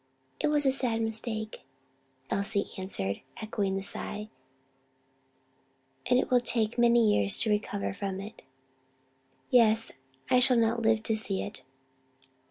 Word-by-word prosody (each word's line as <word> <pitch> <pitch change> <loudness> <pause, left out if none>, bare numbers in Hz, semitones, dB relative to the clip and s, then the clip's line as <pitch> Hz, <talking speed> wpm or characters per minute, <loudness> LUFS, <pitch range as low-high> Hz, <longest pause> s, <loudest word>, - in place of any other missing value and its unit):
"It - - +1
was 295 -1 +2
a 270 - +5
sad 250 -4 +1
mistake," 220 -1 -4 0.7
Elsie 200 +1 -1
answered; 100 - -3 0.2
echoing 205 -3 -2
the 195 - -3
sigh, 210 +2 -5 1.8
"and 250 - +5
it 255 - 0
will 250 - +5
take 230 -2 0
many 235 -2 +5
years 100 -1 +2
to 220 - +1
recover 205 -1 -2
from 195 -1 -4
it." 210 +3 -9 1.1
"Yes, 225 -2 +5 0.4
I 250 - +6
shall 250 0 +4
not 230 0 +2
live 220 -1 +2
to 220 - 0
see 200 -3 0
it." 205 - -8
220 Hz, 135 wpm, -29 LUFS, 200-235 Hz, 1.8 s, I